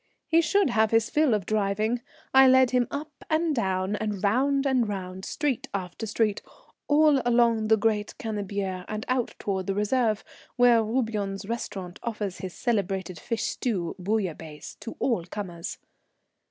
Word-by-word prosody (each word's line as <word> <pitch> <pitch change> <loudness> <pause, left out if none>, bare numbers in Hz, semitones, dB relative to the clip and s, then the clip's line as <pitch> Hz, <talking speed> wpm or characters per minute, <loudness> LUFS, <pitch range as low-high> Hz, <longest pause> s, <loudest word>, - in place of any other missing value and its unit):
He 330 0 +4
should 365 -2 +2
have 220 -1 +3
his 225 0 +2
fill 300 -7 +3
of 200 -4 -3
driving. 215 +3 0 0.3
I 265 0 +8
led 260 -1 +6
him 250 -1 +2
up 295 +2 -5 0.2
and 320 0 +2
down 190 -2 0
and 210 -2 -3
round 270 +7 +2
and 255 -5 +2
round, 190 -1 -5
street 290 -5 -1
after 185 +3 -4
street, 215 -1 0 0.5
all 295 -2 +5
along 235 -2 +3
the 220 0 +5
great 210 -1 0
Cannebière 200 -4 -3
and 215 0 -4
out 255 -2 0
towards 190 -2 -2
the 195 - 0
Reserve, 215 +1 +1 0.3
where 245 -2 +5
Roubion's 215 -4 -2
Restaurant 195 -5 -5
offers 210 -5 -4
his 185 -2 -6
celebrated 195 -7 -1
fish 230 +5 -3
stew, 190 -9 -2
bouillabaise, 180 -6 -3
to 230 - -7
all 230 -10 +1
comers. 175 -2 -6
215 Hz, 155 wpm, -27 LUFS, 195-245 Hz, 0.5 s, I